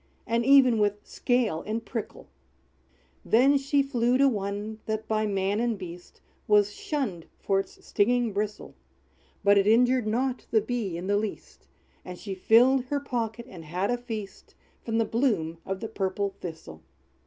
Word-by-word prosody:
And 230 +1 0
even 260 -3 +6
with 205 0 0
scale 240 -10 0
and 225 +1 -3
prickle!" 230 -3 -6 1.0
Then 265 +5 +4
she 280 +1 +1
flew 250 -2 +1
to 275 +1 +5
one, 205 -1 -3
that, 220 0 -3
by 215 0 0
man 195 +1 0
and 235 -2 0
beast 175 -2 -10 0.3
Was 210 -1 +4
shunned 225 - -4
for 195 0 +1
its 195 - -8
stinging 240 +1 +1
bristle; 210 +1 -4 0.7
But 200 0 +5
it 195 - +1
injured 245 +1 +4
not 250 +4 -1
the 220 - +4
Bee 215 -5 -3
in 175 - -6
the 205 +1 +1
least; 210 -1 -6 0.4
And 180 0 -8
she 200 +1 -6
filled 245 +7 +4
her 285 +3 -1
pocket, 235 -4 -4
and 180 -9 -11
had 180 +7 -2
a 245 - +1
feast, 220 -5 -8 0.3
From 225 -1 -2
the 225 - +2
bloom 205 -10 0
of 195 +1 -3
the 225 - -3
purple 200 -1 -2
Thistle. 160 - -9
220 Hz, 165 wpm, -27 LUFS, 195-245 Hz, 1.0 s, even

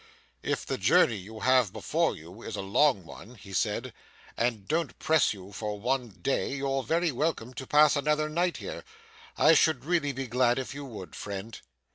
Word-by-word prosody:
'If - - -2
the - - -3
journey 115 - +4
you 110 +4 -10
have 130 -5 +4
before - - 0
you 90 +8 -12
is 115 - -6
a 100 - -4
long 100 - +2
one,' 120 +8 -12
he 95 -2 -12
said, 110 +6 -1 0.4
'and 115 -4 -1
don't 165 -2 -1
press 160 -3 +3
you 100 -1 -9
for 105 0 -4
one 125 +2 -1
day, 105 +8 -2
you're 135 -1 -1
very 165 +4 +1
welcome 130 -3 -2
to 130 -1 -7
pass 150 0 +5
another 150 +1 +1
night 170 +3 0
here. - - -7 0.5
I 155 - +6
should 155 -5 +3
really 165 -4 +1
be 135 0 -4
glad 125 0 +2
if 130 0 -4
you 145 0 -7
would, 110 -8 -9
friend. 100 +2 -6
125 Hz, 185 wpm, -28 LUFS, 105-150 Hz, 0.5 s, I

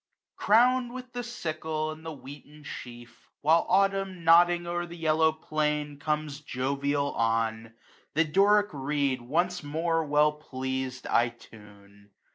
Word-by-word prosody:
C>iROW>rD 245 +3 +4
with 255 -1 -9
the 245 - -3
sickle 155 -9 -4
and 155 +1 -10
the 165 - -6
wheaten 145 +1 -12
sheaf^ 120 -3 -9 0.3
While 160 +3 +3
Autumn, 195 -2 +1
nodding 175 +1 +5
o'er 175 0 -3
the 170 0 -10
yellow 160 0 +3
plain^ 150 -2 -2
Conies 150 -1 -2
jovial 140 +2 -1
on; 115 0 -1 0.4
the 160 - +4
Doric 205 +5 +3
reed 140 -2 -1
once 175 +8 -1
more. 165 +2 -1
Well 150 0 +2
pleas'dj 130 -2 -4
I 120 0 +3
tuoe. 100 -3 -17
150 Hz, 130 wpm, -28 LUFS, 130-170 Hz, 0.4 s, nodding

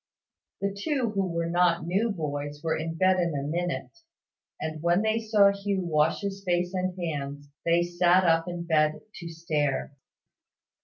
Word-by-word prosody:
The 200 0 -1
two 245 +2 -1
who 195 -2 0
were 170 0 -1
not 170 -1 +2
new 195 +7 +1
boys 145 -5 -4
were 160 - +1
in 165 +1 -4
bed 185 +1 +3
in 170 -3 0
a 140 - -2
minute; 175 - -3 0.6
and 155 -1 -4
when 175 +4 +2
they 220 +1 +1
saw 210 -3 +4
Hugh 200 -2 -2
wash 155 -1 +2
his 195 -1 -4
face 175 -1 0
and 185 0 -2
hands, 145 -3 -4 0.2
they 170 +1 +4
sat 175 +1 +3
up 165 -1 +3
in 175 -1 -4
bed 155 -2 +2 0.2
to 170 -2 -7
stare. 150 -4 -2
175 Hz, 165 wpm, -27 LUFS, 160-190 Hz, 0.6 s, saw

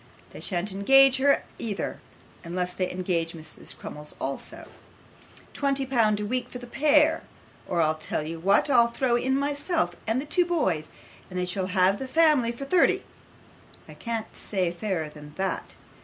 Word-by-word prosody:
They - - -10
shan't 185 +1 -2
engage 270 +7 +6
her 280 +1 +3 0.2
either, 210 -4 -3 0.4
unless 180 +1 -3
they 185 0 -1
engage 175 -3 -1
Mrs. 155 -1 -7
Crummles 150 0 -8
too 135 +1 -4 0.9
twenty 275 -1 0
pound 225 -5 +2
a 210 - -2
week 250 +3 -2
for - - -7
the 245 - -9
pair; 300 +5 +3 0.5
or 175 -2 +1
I'll 155 0 +2
tell 155 -1 -4
you 165 +2 -5
what, 195 - +3
I'll 240 -4 +5
throw 240 +1 0
in 260 +2 +1
myself 290 +4 -1
and 225 +3 +1
the 275 - -4
two 350 +4 +2
boys, 185 - 0 0.4
and 185 - -6
they 180 - 0
shall 185 +1 -2
have 190 +1 +2
the 265 - -4
family 300 -5 +4
for 240 +4 -7
thirty. 355 +5 +3 0.8
I - - -11
can't 230 -2 -5
say 185 -4 -1
fairer 175 -3 -2
than 150 0 -12
that. 190 -1 -3
215 Hz, 170 wpm, -26 LUFS, 180-270 Hz, 0.9 s, engage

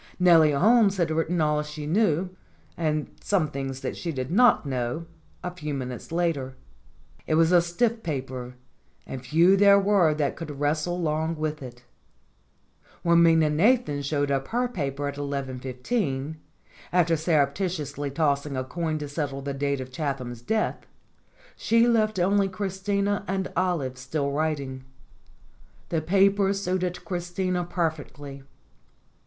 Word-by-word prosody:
Nellie 165 -4 +6
Holmes 205 +5 +4
had 170 -3 +1
writ 160 +1 0
ten 175 +1 -1
all 150 -1 +2
she 150 0 -7
knew, 180 0 +1 0.4
and 155 -2 -1
some 180 -7 +1
things 135 -1 -5
that - - -4
she 170 - -4
did 130 -2 -4
not 240 -2 +5
know, 130 +3 -2 0.4
a 180 - -3
few 150 -5 -5
minutes 125 +2 -6
later. 165 -6 -1 0.7
It 155 - +2
was 165 +1 +4
a 175 -1 +6
stiff 225 +7 0
paper, 130 - -5 0.5
and 130 -1 -7
few 165 +9 +4
there 200 0 +6
were 195 -6 +3
that 145 -3 -1
could 150 -4 -7
wrestle 155 +4 0
long 160 0 -1
with 155 -1 -3
it. 125 -1 -10 1.2
When 170 0 +5
Minna 160 -2 +5
Nathan 175 - +2
showed 145 0 -1
up 135 -1 -1
her 245 +2 0
paper 145 - -3
at 140 0 -5
11.15, 140 - -3 0.5
after 175 -2 +3
surreptitiously 150 -1 -1
tossing 140 -1 0
a 130 - -1
coin 160 +3 -3
to 150 -1 -5
settle 140 -2 -4
the 140 0 -3
date 140 0 -1
of 130 0 -8
Chatham's 130 -4 -4
death, 220 - -1 0.7
she 230 +1 +3
left 215 -3 +2
only 195 +2 +3
Christina 200 +1 -1
and 190 0 -2
Olive 165 -8 -1
still 140 +2 -2
writing. 140 -3 -2 1.1
The 165 -2 0
paper 195 +3 +3
suited 185 -2 -2
Christina 180 0 -2
perfectly. 150 -5 -4
155 Hz, 140 wpm, -26 LUFS, 140-180 Hz, 1.2 s, Nellie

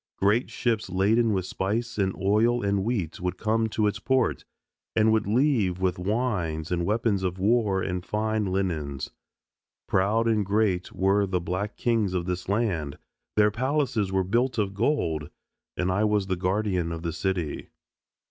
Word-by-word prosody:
Great 105 +5 +2
ships 115 -5 -1
laden 110 +5 +2
with 95 -3 0
spice 110 +5 -2
and 95 -1 +1
oil 110 +5 +2
and 100 -1 +1
wheat 100 -8 -2
would 90 0 -2
come 110 +2 +1
to 110 0 0
its 105 0 0
port, 130 +2 +1 0.5
and 110 0 +4
would 110 -2 +1
leave 110 -6 +2
with 95 -1 0
wines 90 -7 -1
and 85 -1 0
weapons 105 -2 +1
of 90 -1 -2
war 100 -1 +2
and 90 -1 -3
fine 110 +1 -1
linens. 85 -8 -2 0.8
Proud 105 +5 +2
and 110 -2 +2
great 100 -2 0
were 100 +1 +2
the 90 -1 0
black 95 +4 -3
kings 110 -6 +1
of 85 -1 -1
this 90 0 -3
land, 95 -10 -1 0.4
their 105 0 +4
palaces 125 -4 0
were 95 0 +2
built 120 +8 0
of 100 -2 0
gold, 100 - 0 0.5
and 90 +1 0
I 100 +3 +1
was 105 -2 +2
the 95 -1 -1
Guardian 90 -1 0
of 80 0 -5
the 85 -1 -2
City. 90 -3 -2
100 Hz, 165 wpm, -26 LUFS, 90-110 Hz, 0.8 s, and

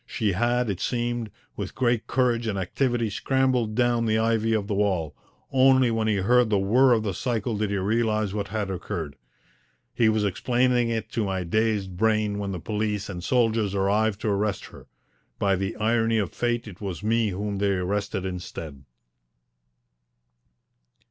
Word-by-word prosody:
She 110 -4 -1
had, 120 +5 +1
it 95 -4 -2
seemed, 120 -1 -2 0.3
with - - -6
great 120 -3 +1
courage 120 -2 +1
and 105 -3 -1
activity 120 +5 0
scrambled 130 -2 0
down 120 -1 +2
the 110 0 +2
ivy 115 0 +1
of 105 -2 0
the 105 - -3
wall; 95 -7 0 0.4
only 130 -2 +5
when 110 -1 0
he 110 - +2
heard 120 +5 +3
the 105 - +2
whirr 120 +7 +4
of 110 -2 +1
the 100 -3 -2
cycle 115 +1 -2
did 105 0 -1
he 100 - -1
realize 110 0 0
what 100 -1 -2
had 105 -1 -3
occurred. 85 -5 -5 0.8
He 115 -2 +3
was 110 -1 +1
explaining 120 +4 +1
it 115 -1 -3
to 115 - -1
my 95 -2 -2
dazed 105 0 0
brain 110 -1 +1
when 100 -1 -3
the 90 - -4
police 105 +1 -2
and 90 -2 -6
soldiers 115 -3 +1
arrived 100 +2 +1
to 110 - -1
arrest 100 0 -1
her. - - -13 0.5
By 100 -1 +2
the 95 +3 -3
irony 115 +1 +1
of 100 -4 -1
fate 120 -1 -1
it 100 -1 -11
was 95 -1 -5
me 115 0 +2
whom 100 +1 -3
they 100 0 +2
arrested 95 +1 -2
instead. 85 -6 -6
110 Hz, 170 wpm, -25 LUFS, 100-115 Hz, 0.8 s, only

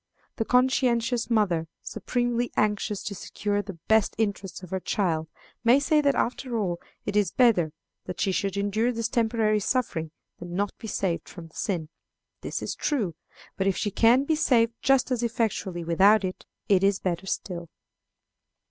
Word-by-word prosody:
The 225 - 0
conscientious 245 -2 +2
mother, 185 -8 +2 0.2
supremely 245 -1 -1
anxious 210 -1 0
to 205 - -4
secure 205 +1 -2
the 195 -3 -9
best 220 -2 +3
interests 200 -4 -2
of 180 - -10
her 190 - -1
child, 165 -5 -1 0.4
may 245 +3 +6
say 300 +1 +3
that, 280 -1 +2
after 245 0 -1
all, 180 -5 -1 0.2
it 205 - -3
is 205 -4 +3
better 195 -9 +3 0.3
that 180 - -6
she 195 - +1
should 195 +1 -1
endure 210 +4 +1
this 230 -2 -1
temporary 220 -2 +1
suffering 200 -8 -1 0.3
than 175 0 -7
not 200 +1 -1
be 225 - -7
saved 185 -5 -2
from 170 -3 -10
the - - -25
sin. 165 -6 -2 0.5
This - - -4
is - - -2
true. 225 - -1 0.4
But 190 - 0
if 195 - +1
she 205 - -1
can 235 +6 +5
be 315 - +1
saved 235 -7 +3
just 270 -1 +3
as 245 -2 +1
effectually 220 -6 -1
without 195 +6 +5
it, 185 -1 -5 0.2
it 195 -2 +4
is 200 0 +4
better 185 0 -3
still. 175 -4 -4
210 Hz, 170 wpm, -26 LUFS, 185-235 Hz, 0.5 s, may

